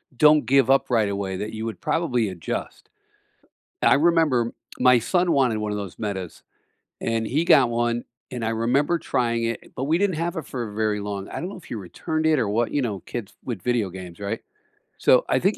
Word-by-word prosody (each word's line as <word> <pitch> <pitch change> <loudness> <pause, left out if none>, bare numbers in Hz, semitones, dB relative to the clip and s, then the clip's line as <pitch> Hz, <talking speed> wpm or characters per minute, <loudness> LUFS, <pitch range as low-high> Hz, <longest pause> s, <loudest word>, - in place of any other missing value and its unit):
don't 150 +1 +5
give 135 +1 +4
up 135 0 +3
right 110 -5 +2
away, 100 -1 -3
that 105 +3 -5
you 110 0 -4
would 110 -6 -6
probably 125 -10 0
adjust. 85 -4 -5 0.9
I - - +5
remember 150 -7 +3 0.3
my 125 -1 +6
son 175 +8 +1
wanted 130 -7 +2
one 105 -1 -2
of 105 - -2
those 100 -3 -7
Metas, 95 -5 -4 0.6
and 115 -1 -1
he 150 +8 0
got 130 -7 +6
one, 120 0 0 0.3
and 125 -2 -4
I 115 - 0
remember 125 +9 +1
trying 115 -6 0
it, 115 0 -4
but 130 - -3
we 155 +4 +2
didn't 200 -3 +1
have 170 +2 -2
it 160 - -5
for 120 -5 -4
very 105 0 0
long. 100 -1 -5
I - - -5
don't 175 - -4
know 200 - -8
if 180 - -14
he - - -6
returned 115 - -3
it 155 -2 +4
or 110 - 0
what, 115 +3 0
you 145 - +1
know, 105 -7 -3
kids 105 +1 -6
with 115 -7 -4
video 120 -4 0
games, 90 -1 -9
right? 100 +2 -3 0.6
So - - +4
I - - +2
think - - +1
120 Hz, 210 wpm, -24 LUFS, 105-145 Hz, 0.9 s, my